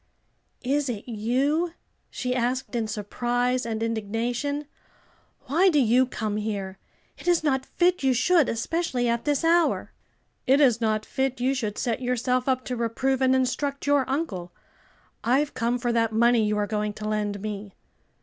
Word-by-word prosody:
"Is 280 +1 0
it 220 -2 -5
you?" 265 +10 0 0.4
she 250 -1 -3
asked 255 +2 -1
in 230 -2 0
surprise 245 +4 -1
and 225 -1 -2
indignation. 230 +6 -2 0.8
"Why 325 +8 +3
do 310 - +2
you 250 +1 +4
come 215 -4 -3
here? 200 -3 -4 0.4
it - - -11
is 350 -2 +3
not 265 -3 0
fit 360 +1 +1
you 265 -1 +3
should, 320 +4 +3
especially 250 +1 -1
at 235 0 0
this 290 +1 +1
hour." 335 0 +2 0.6
"It 270 +2 +5
is 245 -5 +4
not 215 -1 0
fit 265 -1 -2
you 255 +2 +1
should 220 -6 -3
set 235 0 -1
yourself 250 +1 0
up 255 -1 0
to 250 - -3
reprove 245 +3 -1
and 260 0 +4
instruct 275 +2 -1
your 285 -2 +2
uncle, 200 - -3 0.7
I've 275 +5 +2
come 235 +1 0
for 240 -1 -1
that 230 -1 +2
money 235 +1 +4
you 210 0 0
are 210 - +1
going 210 0 -2
to 215 +1 -6
lend 210 -1 -1
me." 205 -1 -6
245 Hz, 165 wpm, -25 LUFS, 220-270 Hz, 0.8 s, It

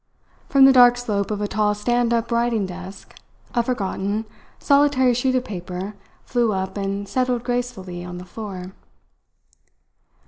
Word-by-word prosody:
From 275 -1 +7
the 270 - +7
dark 245 -1 +7
slope 210 -5 -2
of 210 -1 -3
a 205 - 0
tall 210 0 +1
stand 240 +3 +1
up 235 0 0
writing 235 -3 +1
desk 185 +1 -9 0.4
a 240 - +3
forgotten, 210 -2 -2 0.3
solitary 280 -3 +3
sheet 255 +2 +1
of 255 0 0
paper 185 0 -6 0.3
flew 235 -3 +1
up 190 0 -3
and 200 0 -3
settled 250 +1 0
gracefully 240 -8 -3
on 180 0 -7
the 180 - -8
floor. 190 -2 -7
215 Hz, 145 wpm, -22 LUFS, 195-245 Hz, 0.4 s, From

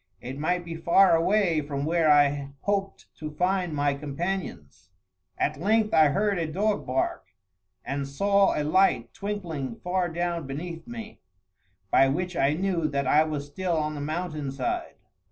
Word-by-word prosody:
It 130 +6 -7
might 175 +3 0
be 170 - -6
far 170 +3 +5
away 170 -1 +2
from 140 -1 -4
where 165 0 +2
I 145 -1 +3
hoped 195 -1 -2
to 155 - -5
find 180 +3 0
my 145 -1 +1
companions. 145 - -5 0.5
At - - -1
length 215 +2 +2
I 155 -1 +6
heard 200 +5 +1
a 160 -2 -2
dog 205 +5 0
bark, 130 -6 -1 0.6
and 140 0 -3
saw 200 +7 +2
a - - 0
light 185 +6 +2
twinkling 175 - -4
far 180 0 0
down 170 -2 -2
beneath 165 - -6
me, 225 -2 -8 0.7
by 135 - +6
which 175 +6 -2
I 140 -1 +2
knew 175 -1 0
that 140 -2 -1
I 150 +4 +5
was 150 -2 -3
still 170 +3 -2
on 155 0 -1
the 145 - -5
mountain 155 -1 -3
side. 350 - -3
165 Hz, 160 wpm, -26 LUFS, 145-190 Hz, 0.7 s, I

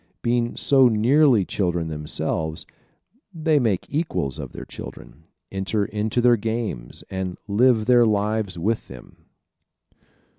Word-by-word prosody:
Being 120 0 0
so 135 -2 +5
nearly 120 0 +4
children 85 -4 -1
themselves 80 +1 -3 0.7
they 160 -3 +1
make 110 -8 0
equals 140 - -2
of - - -6
their - - -8
children, 80 +2 -11 0.3
enter 95 +2 -1
into 110 +4 -1
their 120 -1 +5
games 110 - -4
and 95 -1 -4
live 110 +2 +3
their 120 -1 +5
lives 105 -2 0
with 105 +7 -1
them. 65 -2 -14
110 Hz, 120 wpm, -23 LUFS, 90-120 Hz, 0.7 s, so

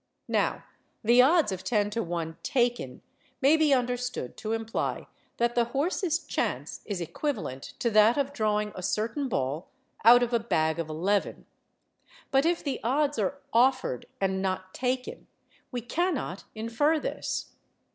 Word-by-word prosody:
Now, - - +1 0.4
the 240 +3 +6
odds 300 - +4
of 185 -1 -4
10 210 -3 +1
to 230 +2 -1
1 165 -3 -4
taken 245 -2 -1 0.4
may 285 +3 +5
be 315 -2 +3
understood 250 - -1
to 220 +1 -3
imply 225 0 -2 0.3
that 235 0 +1
the 240 -1 +2
horse's 320 +6 0
chance - - -3
is 200 -4 -3
equivalent 170 - -3 0.2
to 235 - 0
that 215 +3 +5
of 280 0 0
drawing 210 -3 0
a 185 - -7
certain 230 - -1
ball 140 - -2 0.3
out 245 +2 +8
of 240 0 -2
a 235 - +4
bag 160 -7 0
of 165 -2 -3
eleven. 190 +6 -1 0.9
But 270 +3 +4
if 345 0 0
the 280 -3 -2
odds 290 +5 +1
are 280 - -1
offered 250 - +2
and 190 -1 0
not 185 -1 -2
taken, 255 0 -3 0.4
we 245 -2 -3
cannot 285 - -2
infer 230 +8 +1
this. - - -4
235 Hz, 150 wpm, -28 LUFS, 195-270 Hz, 0.9 s, out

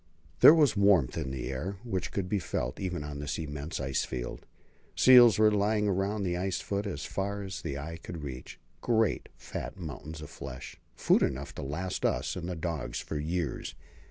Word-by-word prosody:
There 155 - +10
was 145 -8 +4
warmth 100 -9 +4
in 75 -5 -3
the 65 0 -4
air 90 +9 -4
which 95 -7 -3
could 95 -2 -2
be 100 +2 0
felt, 65 -7 -3
even 90 -5 -3
on 75 -1 -6
this 70 0 -3
immense 75 0 -5
ice 65 -1 0
field. - - -5 0.5
Seals 120 -5 +8
were 110 0 +5
lying 105 +1 +2
along 100 +2 0
the 90 -2 -1
ice 95 +1 -1
foot 100 +1 -2
as 70 -8 -4
far 100 +1 -3
as 95 -1 -6
the 70 - -4
eye 80 +3 -6
could 85 -4 -7
reach 65 -3 -7 0.2
great, 115 -3 +1
fat - - -6
mountains 80 -2 -7
of 75 -1 -9
flesh; 70 -2 -8
food - - +3
enough 70 +1 -1
to - - -6
last 85 +7 -3
us - - 0
and 85 -1 -4
the 90 - -3
dogs 80 -3 -3
for 75 - -4
years. 80 +1 -3
85 Hz, 190 wpm, -30 LUFS, 70-100 Hz, 0.5 s, There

